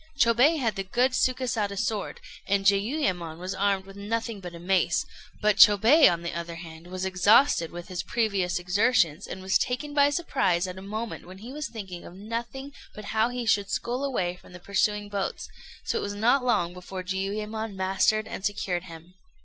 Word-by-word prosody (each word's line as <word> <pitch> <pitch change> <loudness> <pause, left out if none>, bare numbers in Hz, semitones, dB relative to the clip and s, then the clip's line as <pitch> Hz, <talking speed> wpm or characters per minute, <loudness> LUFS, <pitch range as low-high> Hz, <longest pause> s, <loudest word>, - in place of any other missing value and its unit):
Chôbei 250 +6 +4
had 225 -6 -1
the 195 - -1
good 245 +7 +1
Sukésada 250 -6 0
sword, 215 -1 -2 0.3
and 195 0 +1
Jiuyémon 195 - +1
was 185 +2 -4
armed 195 0 0
with 195 0 -13
nothing 225 +2 -3
but 180 -2 -8
a - - -9
mace; 185 +2 +1 0.4
but 210 -1 +3
Chôbei, 220 - +7
on 170 0 -3
the 170 - -4
other 170 0 -5
hand, 165 0 -10
was 185 +1 -4
exhausted 190 - +4
with 175 0 -8
his 180 -2 -4
previous 200 -6 0
exertions, 180 -2 +1
and 190 - -7
was 190 +1 +2
taken 290 +4 -2
by 285 -1 +5
surprise 195 - 0
at 185 0 -6
a - - -10
moment 215 +1 -5
when 185 +1 -11
he 230 +6 -9
was 300 +1 -4
thinking 190 -6 -8
of 175 - -11
nothing 235 +7 -6 0.2
but 210 - -9
how 220 +2 +3
he 245 -1 -4
should 205 -3 +2
scull 240 +6 -2
away 185 -11 -1
from 180 - -17
the 180 - -10
pursuing 205 +2 0
boats; 200 -1 -3 0.4
so - - 0
it - - -3
was 205 0 -4
not 245 +6 +3
long 175 -8 +1
before 185 +1 -7
Jiuyémon 210 +3 -3
mastered 195 +3 +1
and - - -7
secured 185 -3 -2
him. 170 0 -12
200 Hz, 190 wpm, -27 LUFS, 185-230 Hz, 0.4 s, Chôbei